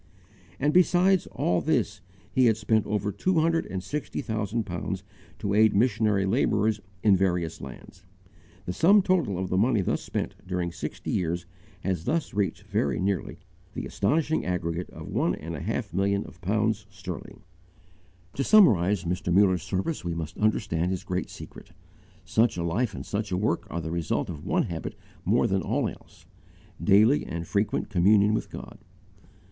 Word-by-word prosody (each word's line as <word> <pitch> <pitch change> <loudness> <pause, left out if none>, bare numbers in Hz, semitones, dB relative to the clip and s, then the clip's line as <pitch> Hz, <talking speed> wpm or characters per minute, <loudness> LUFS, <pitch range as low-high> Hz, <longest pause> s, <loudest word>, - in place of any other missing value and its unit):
And 145 +2 +2
besides 180 +1 +4
all 90 0 0
this 115 -11 0 0.3
he 130 -2 +4
had 110 -2 +3
spent 110 0 +1
over 105 0 -1
two 165 - +1
hundred 165 0 +1
and 95 -1 -4
sixty 150 +5 -4
thousand 110 0 -2
pounds 85 -4 -4 0.3
to 100 - -2
aid 110 0 +5
missionary 105 -3 +2
labourers 105 0 +1 0.2
in 105 -3 +6
various 90 -3 0
lands. 65 -3 -11 0.6
The 90 - -3
sum 190 - +5
total 175 - +1
of 95 0 -3
the 95 - +1
money 115 -1 +3
thus - - -1
spent - - -3
during 90 -2 -2
sixty - - -5
years 85 0 -1 0.4
has 90 -3 -2
thus 165 0 -1
reached 100 -5 -1
very 70 -3 -1
nearly 95 -2 -2 0.3
the - - -4
astonishing 155 +9 0
aggregate 90 -1 -2
of - - -10
one - - 0
and 80 +2 -6
a - - -5
half - - -3
million 100 +2 +1
of 85 - -14
pounds 105 +2 0
sterling 95 -3 -8 0.9
($7,500,000). - - -26
To 135 - +1
summarize 105 - +5
Mr. 90 +1 -2
Muller's 95 -1 +4
service 95 - -2
we 85 -1 -3
must 80 -2 -5
understand 100 -5 +1
his 95 -1 -3
great 90 -1 -3
secret. - - -11 0.5
Such 110 +3 +2
a 85 - -1
life 100 +5 -1
and - - -6
such 105 0 -3
a 90 - +1
work 100 -2 0
are 85 - -3
the 80 0 -5
result 85 -2 -1
of 75 - -8
one - - +2
habit - - -5 0.3
more - - +3
than 95 0 +1
all - - 0
else, - - -11 0.6
daily 110 +9 +5
and 85 +1 -5
frequent 105 +3 -1
communion 105 +3 +4
with 110 - -2
God. - - -9
100 Hz, 170 wpm, -27 LUFS, 90-110 Hz, 0.9 s, in